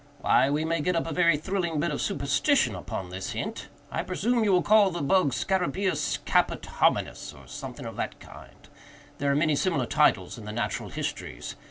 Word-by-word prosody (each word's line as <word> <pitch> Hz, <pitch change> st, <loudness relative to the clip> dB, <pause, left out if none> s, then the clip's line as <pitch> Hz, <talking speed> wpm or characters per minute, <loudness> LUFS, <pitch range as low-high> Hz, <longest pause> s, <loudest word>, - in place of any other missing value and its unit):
Why, 135 Hz, -, +4 dB
we 150 Hz, +2 st, 0 dB
may 165 Hz, -1 st, 0 dB
get 180 Hz, +3 st, 0 dB
up 165 Hz, -, 0 dB
a 165 Hz, -, -4 dB
very 170 Hz, -1 st, +4 dB
thrilling 170 Hz, -1 st, -2 dB
bit 165 Hz, +1 st, 0 dB
of 145 Hz, -, -2 dB
superstition 140 Hz, -, +1 dB
upon 90 Hz, 0 st, -6 dB
this 95 Hz, +1 st, -5 dB
hint. -, -, -5 dB, 0.2 s
I -, -, -1 dB
presume 225 Hz, +6 st, 0 dB
you 205 Hz, -, +3 dB
will 180 Hz, -1 st, +4 dB
call 210 Hz, -2 st, +5 dB
the 175 Hz, -4 st, -4 dB
bug 185 Hz, +1 st, +3 dB
scarabæus 190 Hz, +4 st, 0 dB
caput -, -, +2 dB
hominis, -, -, 0 dB
or 70 Hz, -, -15 dB
something -, -, -8 dB
of -, -, -7 dB
that -, -, -4 dB
kind—there 140 Hz, -1 st, -8 dB
are -, -, +2 dB
many 155 Hz, 0 st, +2 dB
similar 145 Hz, -5 st, +1 dB
titles 115 Hz, -, +2 dB
in 105 Hz, -, -10 dB
the 105 Hz, -, -5 dB
Natural 120 Hz, +2 st, -3 dB
Histories. -, -, -5 dB
160 Hz, 190 wpm, -27 LUFS, 140-185 Hz, 0.2 s, call